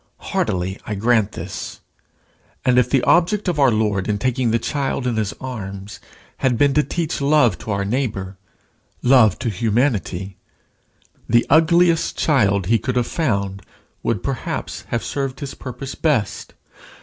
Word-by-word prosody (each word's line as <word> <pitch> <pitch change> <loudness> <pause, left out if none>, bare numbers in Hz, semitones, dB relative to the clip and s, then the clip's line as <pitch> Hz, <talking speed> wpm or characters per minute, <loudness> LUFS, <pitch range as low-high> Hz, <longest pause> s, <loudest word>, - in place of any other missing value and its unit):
Heartily 95 +2 -1
I 105 - -2
grant 110 0 +2
this. 90 +3 -6 0.9
And 125 -1 +5
if 125 -1 +2
the 130 -2 +2
object 195 +4 +3
of 170 -4 0
our 135 -2 +6
Lord 105 -3 0
in 105 - +1
taking 125 +2 0
the 115 - +2
child 135 +1 -2
in 125 -2 0
his 110 -3 -1
arms 100 -6 -7 0.4
had 125 -3 +1
been 140 +2 +3
to 150 - +4
teach 160 -1 -3
love 140 -4 +3
to - - -9
our 100 -1 0
neighbour, 100 -5 -2 0.7
love 120 -6 +5
to 120 - -2
humanity, 105 -4 -1 0.9
the 120 +1 +4
ugliest 165 +1 +4
child 100 - +2
he 115 +4 +3
could 125 -1 -3
have 125 -1 +2
found, 100 - -1 0.4
would, 105 -6 -1
perhaps, 135 -4 -4
have 120 - -2
served 135 -2 -3
his 140 -3 -5
purpose 130 +1 -7
best. 145 -10 -1
120 Hz, 150 wpm, -21 LUFS, 100-140 Hz, 0.9 s, our